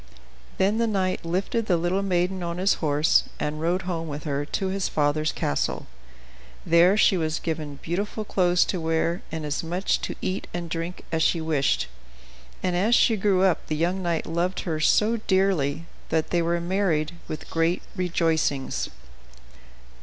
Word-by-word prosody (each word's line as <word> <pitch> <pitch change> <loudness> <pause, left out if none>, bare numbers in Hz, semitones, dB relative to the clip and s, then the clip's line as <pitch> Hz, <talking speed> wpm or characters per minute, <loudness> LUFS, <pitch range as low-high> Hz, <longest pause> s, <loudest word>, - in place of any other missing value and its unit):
Then 205 +4 +2
the 230 - +2
knight 190 -3 0
lifted 195 +6 -1
the 175 - +3
little 175 +3 0
maiden 185 -1 0
on 170 0 -3
his 190 +2 +3
horse, 150 0 +3
and 150 +1 -2
rode 175 +3 0
home 170 -3 -3
with 145 -1 -5
her 145 -1 -2
to 190 +5 -2
his 195 0 -1
father's 155 +1 +1
castle. 70 - -1 0.8
There 175 +4 +5
she 200 -3 +4
was 155 -2 -1
given 155 -3 -4
beautiful 205 +5 -3
clothes 180 -3 +3
to 180 - -2
wear, 165 +2 0
and 160 -1 -4
as 150 0 -1
much 175 +4 0
to - - -4
eat 185 - -3
and 170 -2 -4
drink 170 +2 -4
as 160 -1 0
she 165 - +3
wished, 155 - +1 0.8
and 180 - 0
as 210 +7 +3
she 230 - +4
grew 195 -2 +2
up 185 -3 +2
the 155 - -1
young 175 +5 0
knight 170 -2 -1
loved 175 +3 -1
her 160 -3 -2
so 215 +8 +3
dearly 185 -7 +1 0.2
that 160 -1 0
they 175 - +2
were 170 +1 +1
married 170 -3 0 0.2
with 155 - -7
great 165 +2 +1
rejoicings. 165 -6 0
170 Hz, 170 wpm, -25 LUFS, 160-190 Hz, 0.8 s, There